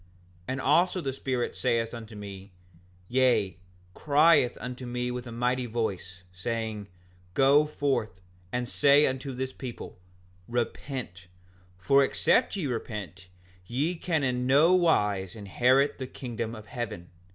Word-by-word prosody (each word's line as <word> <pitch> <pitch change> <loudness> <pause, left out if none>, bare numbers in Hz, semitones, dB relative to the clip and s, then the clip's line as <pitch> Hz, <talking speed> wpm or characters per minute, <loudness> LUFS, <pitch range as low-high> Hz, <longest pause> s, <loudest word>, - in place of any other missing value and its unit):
5:51 90 - -28 0.4
And 130 0 -2
also 175 +7 +3
the 135 -6 -3
Spirit 130 -2 -2
saith 115 -2 0
unto 115 -2 -8
me, 100 -1 -9 0.6
yea, 120 -8 +2 0.3
crieth 150 - +4
unto 125 0 -6
me 125 0 -2
with 125 0 -5
a - - -7
mighty 125 +2 0
voice, 95 -5 -4
saying: 110 +1 -4 0.5
Go 140 +3 +5
forth 135 -10 -1 0.3
and 125 0 -2
say 145 +3 +5
unto 130 +1 -2
this 130 +1 -4
people—Repent, 90 0 -6 0.5
for 135 +10 +4
except 225 - +2
ye 190 -6 -2
repent 105 - -5 0.4
ye 145 +8 0
can 165 -3 -1
in 125 -1 0
nowise 135 - +3
inherit 125 +8 +2
the 130 - -4
kingdom 115 -3 -5
of 110 -1 -10
heaven. 105 -9 -6
125 Hz, 130 wpm, -28 LUFS, 105-135 Hz, 0.6 s, Go